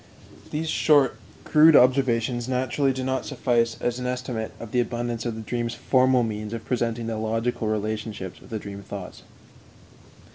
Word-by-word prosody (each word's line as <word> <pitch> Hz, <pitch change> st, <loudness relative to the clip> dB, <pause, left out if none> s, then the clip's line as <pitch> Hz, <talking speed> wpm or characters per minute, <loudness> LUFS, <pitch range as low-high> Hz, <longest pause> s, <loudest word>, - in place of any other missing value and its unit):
These 155 Hz, +2 st, -3 dB
short, 145 Hz, -6 st, +3 dB, 0.3 s
crude 155 Hz, 0 st, +6 dB
observations 125 Hz, -2 st, +3 dB
naturally 130 Hz, +2 st, +1 dB
do 130 Hz, 0 st, -3 dB
not 130 Hz, 0 st, -1 dB
suffice 115 Hz, -2 st, 0 dB
as 120 Hz, +1 st, -1 dB
an 125 Hz, -, -3 dB
estimate 125 Hz, -3 st, -3 dB
of 115 Hz, -2 st, -8 dB
the 125 Hz, -, +1 dB
abundance 120 Hz, 0 st, -2 dB
of 115 Hz, -, -3 dB
the 110 Hz, -, -6 dB
dream's 120 Hz, +1 st, -3 dB
formal 130 Hz, -1 st, +3 dB
means 105 Hz, -1 st, -4 dB
of 115 Hz, -1 st, -6 dB
presenting 120 Hz, -2 st, -1 dB
the 115 Hz, -1 st, -3 dB
logical 115 Hz, +1 st, -1 dB
relationships 105 Hz, -2 st, -3 dB
of -, -, -16 dB
the 110 Hz, -, -3 dB
dream 100 Hz, -1 st, -8 dB
thoughts. 100 Hz, -2 st, -8 dB
120 Hz, 160 wpm, -25 LUFS, 110-130 Hz, 0.3 s, crude